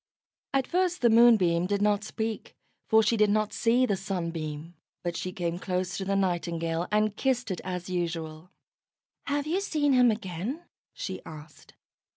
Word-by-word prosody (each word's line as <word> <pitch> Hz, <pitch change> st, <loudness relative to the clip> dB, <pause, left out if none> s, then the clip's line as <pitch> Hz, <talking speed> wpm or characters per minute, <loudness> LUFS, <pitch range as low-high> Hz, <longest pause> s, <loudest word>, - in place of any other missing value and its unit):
At 270 Hz, -1 st, +1 dB
first 360 Hz, 0 st, 0 dB
the 235 Hz, -2 st, +5 dB
Moonbeam 200 Hz, -7 st, +5 dB
did 200 Hz, +1 st, 0 dB
not 205 Hz, 0 st, +2 dB
speak, 220 Hz, +1 st, -4 dB, 0.3 s
for 220 Hz, 0 st, +5 dB
she 225 Hz, +2 st, +2 dB
did 210 Hz, -1 st, +4 dB
not 215 Hz, 0 st, +1 dB
see 245 Hz, +2 st, +3 dB
the 205 Hz, -, 0 dB
Sunbeam, 170 Hz, -4 st, -4 dB, 0.3 s
but 175 Hz, -1 st, -2 dB
she 185 Hz, -, -3 dB
came 175 Hz, -1 st, -3 dB
close 180 Hz, -1 st, -2 dB
to 195 Hz, -, -3 dB
the 195 Hz, +1 st, 0 dB
Nightingale, 170 Hz, -3 st, -1 dB
and 210 Hz, 0 st, +2 dB
kissed 245 Hz, -3 st, 0 dB
it 180 Hz, -, -4 dB
as 180 Hz, -1 st, -4 dB
usual. 165 Hz, -2 st, -4 dB, 0.8 s
"Have 285 Hz, 0 st, 0 dB
you 345 Hz, +6 st, 0 dB
seen 295 Hz, -7 st, +1 dB
him 250 Hz, -1 st, +6 dB
again?" 215 Hz, -, -3 dB, 0.3 s
she -, -, -6 dB
asked. 155 Hz, -1 st, -12 dB
195 Hz, 165 wpm, -28 LUFS, 175-235 Hz, 0.8 s, him